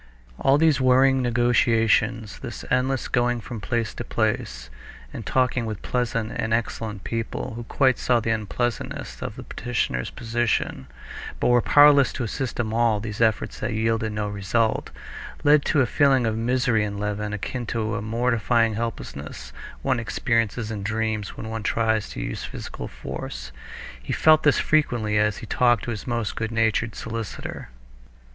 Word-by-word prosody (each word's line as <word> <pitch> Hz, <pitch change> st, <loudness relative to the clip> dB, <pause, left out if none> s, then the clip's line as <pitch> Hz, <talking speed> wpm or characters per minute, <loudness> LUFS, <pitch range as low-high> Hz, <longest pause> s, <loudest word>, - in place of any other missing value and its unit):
All 135 Hz, +1 st, +4 dB
these 155 Hz, -3 st, +3 dB
worrying 130 Hz, +1 st, +4 dB
negotiations, 115 Hz, -2 st, +2 dB
this -, -, -7 dB
endless 125 Hz, +1 st, +1 dB
going 120 Hz, -1 st, +1 dB
from 115 Hz, -1 st, -7 dB
place 115 Hz, 0 st, -1 dB
to -, -, -5 dB
place, 60 Hz, -1 st, -2 dB, 0.4 s
and -, -, -7 dB
talking 125 Hz, -2 st, +1 dB
with 110 Hz, -3 st, -5 dB
pleasant 115 Hz, -2 st, -1 dB
and 110 Hz, -1 st, +1 dB
excellent 110 Hz, -3 st, -4 dB
people, 115 Hz, 0 st, -4 dB
who 120 Hz, +1 st, -7 dB
quite 130 Hz, +1 st, +2 dB
saw 120 Hz, -2 st, +2 dB
the 115 Hz, 0 st, -1 dB
unpleasantness 110 Hz, +2 st, -3 dB
of -, -, -5 dB
the -, -, -8 dB
petitioner's 115 Hz, -, -2 dB
position, 115 Hz, -, -1 dB, 0.5 s
but -, -, +2 dB
were 120 Hz, 0 st, +5 dB
powerless 145 Hz, +1 st, +6 dB
to 130 Hz, -, -3 dB
assist 125 Hz, +3 st, -3 dB
him—all 115 Hz, -1 st, +2 dB
these 105 Hz, 0 st, -5 dB
efforts 110 Hz, -2 st, +1 dB
that 105 Hz, +2 st, -2 dB
yielded 110 Hz, 0 st, 0 dB
no 105 Hz, 0 st, -2 dB
result, 105 Hz, +3 st, 0 dB, 0.5 s
led 145 Hz, 0 st, +5 dB
to 145 Hz, -, +3 dB
a -, -, +4 dB
feeling 135 Hz, -1 st, +3 dB
of 110 Hz, -1 st, 0 dB
misery 120 Hz, -1 st, +1 dB
in 100 Hz, -1 st, -3 dB
Levin 105 Hz, 0 st, -2 dB
akin 115 Hz, +3 st, -4 dB
to 110 Hz, -1 st, -2 dB
the 105 Hz, -2 st, -2 dB
mortifying 115 Hz, 0 st, +1 dB
helplessness 105 Hz, -10 st, -5 dB, 0.3 s
one 130 Hz, -3 st, +1 dB
experiences 115 Hz, -1 st, -1 dB
in 105 Hz, -2 st, -4 dB
dreams 110 Hz, 0 st, -2 dB
when 110 Hz, -, -6 dB
one 110 Hz, 0 st, -4 dB
tries 110 Hz, 0 st, 0 dB
to -, -, -7 dB
use -, -, -4 dB
physical -, -, -7 dB
force. 60 Hz, +1 st, -7 dB, 0.5 s
He -, -, -4 dB
felt 155 Hz, -1 st, +5 dB
this 145 Hz, -, +4 dB
frequently 120 Hz, -9 st, +1 dB
as 105 Hz, -1 st, +1 dB
he -, -, -8 dB
talked 120 Hz, -1 st, +2 dB
to 120 Hz, -, -3 dB
his 110 Hz, +1 st, -6 dB
most 115 Hz, -3 st, -2 dB
good 110 Hz, 0 st, -3 dB
natured 115 Hz, 0 st, +1 dB
solicitor. 115 Hz, -, -6 dB
115 Hz, 160 wpm, -24 LUFS, 110-125 Hz, 0.5 s, powerless